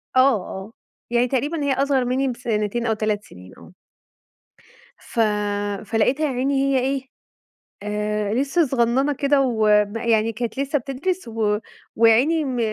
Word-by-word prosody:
آه، -, -, +5 dB, 0.2 s
آه، 190 Hz, +4 st, -8 dB, 0.4 s
يعني 240 Hz, +1 st, +2 dB
تقريبًا 290 Hz, +5 st, -1 dB
هي 280 Hz, -1 st, +1 dB
أصغر 270 Hz, -1 st, +1 dB
مني 260 Hz, +2 st, 0 dB
بسنتين 235 Hz, -2 st, -2 dB
أو 225 Hz, -, +2 dB
3 215 Hz, -1 st, -1 dB
سنين 90 Hz, +1 st, -14 dB
آه. 85 Hz, +2 st, -15 dB, 1.3 s
ف -, -, -7 dB, 0.7 s
فلقيتها 245 Hz, +8 st, +1 dB
يا 295 Hz, -, 0 dB
عيني 265 Hz, +3 st, 0 dB
هي 275 Hz, -1 st, +2 dB
إيه، 265 Hz, 0 st, -2 dB, 0.7 s
آآ، 210 Hz, 0 st, -2 dB
لسه 280 Hz, +6 st, +1 dB
صغننة 260 Hz, +2 st, +1 dB
كده 280 Hz, 0 st, +2 dB
وما 215 Hz, -3 st, +2 dB
يعني 225 Hz, -1 st, +2 dB
كانت 235 Hz, +2 st, -4 dB
لسه 280 Hz, +1 st, 0 dB
بتدرس 275 Hz, +5 st, -3 dB
و 215 Hz, -2 st, 0 dB, 0.4 s
ويا 225 Hz, 0 st, +6 dB
عيني 310 Hz, +7 st, +2 dB
م 260 Hz, -3 st, -3 dB
245 Hz, 145 wpm, -22 LUFS, 215-275 Hz, 1.3 s, ويا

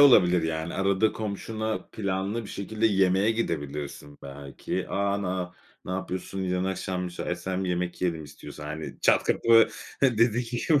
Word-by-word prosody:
olabilir, 90 Hz, -11 st, +7 dB
yani, 80 Hz, +1 st, -2 dB
arada 100 Hz, +2 st, +2 dB
komşuna 110 Hz, +1 st, -3 dB
planlı 100 Hz, +2 st, -1 dB
bir -, -, -9 dB
şekilde 110 Hz, +3 st, 0 dB
yemeğe 95 Hz, 0 st, +3 dB
gidebilirsin 75 Hz, -7 st, -3 dB
belki. 70 Hz, 0 st, -5 dB
"A, 100 Hz, 0 st, 0 dB
na 90 Hz, -1 st, -2 dB, 0.3 s
ne -, -, -6 dB
yapıyorsun? 95 Hz, +1 st, -3 dB
Yarın 90 Hz, 0 st, 0 dB
akşam 95 Hz, -1 st, -2 dB
müsaitsen 95 Hz, +1 st, -3 dB
bir -, -, -2 dB
yemek 90 Hz, 0 st, -2 dB
yiyelim 80 Hz, -4 st, 0 dB
istiyorsan." 75 Hz, +1 st, -10 dB
Hani, 75 Hz, +1 st, -6 dB
çat -, -, +4 dB
kapı, 115 Hz, -1 st, +5 dB, 0.3 s
hı, 125 Hz, -5 st, +3 dB
dedi 115 Hz, +1 st, +4 dB
ki 120 Hz, +1 st, -3 dB
şu 150 Hz, +2 st, +3 dB
95 Hz, 155 wpm, -27 LUFS, 85-110 Hz, 0.3 s, olabilir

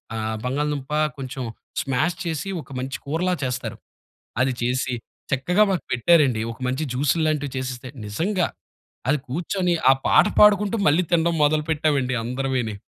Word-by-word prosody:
ఆ -, -, -3 dB, 0.3 s
బంగాళదుంప 145 Hz, +1 st, -2 dB, 0.3 s
కొంచెం 130 Hz, -1 st, -5 dB, 0.4 s
స్మాష్ 150 Hz, +6 st, 0 dB
చేసి 165 Hz, +4 st, -3 dB
ఒక 140 Hz, -, -16 dB
మంచి 130 Hz, +1 st, -4 dB
కూరలా 165 Hz, +6 st, 0 dB
చేస్తారు. 130 Hz, 0 st, -3 dB, 0.6 s
అది 130 Hz, 0 st, +3 dB
చేసి 125 Hz, +1 st, 0 dB, 0.4 s
చక్కగా 180 Hz, +10 st, +3 dB
మాకు 185 Hz, -, -1 dB
పెట్టారండి. 130 Hz, -3 st, +4 dB
ఒక 115 Hz, -, -13 dB
మంచి 130 Hz, +5 st, -1 dB
జ్యూసు‌ల్లాంటివి 145 Hz, +1 st, +1 dB
చేసిస్తే, 130 Hz, -1 st, -5 dB, 0.2 s
నిజంగా 175 Hz, -, 0 dB, 0.6 s
అది 150 Hz, +2 st, +3 dB
కూర్చొని 180 Hz, +5 st, -1 dB, 0.2 s
ఆ -, -, +8 dB
పాట -, -, +6 dB
పాడుకుంటూ 210 Hz, +1 st, +5 dB
మళ్ళీ 155 Hz, +5 st, +4 dB
తిండం 170 Hz, 0 st, +3 dB
మొదలు 150 Hz, +1 st, +2 dB
పెట్టామండి 145 Hz, -4 st, +1 dB
అందరివీని. 125 Hz, -2 st, -1 dB
145 Hz, 135 wpm, -23 LUFS, 130-170 Hz, 0.6 s, ఆ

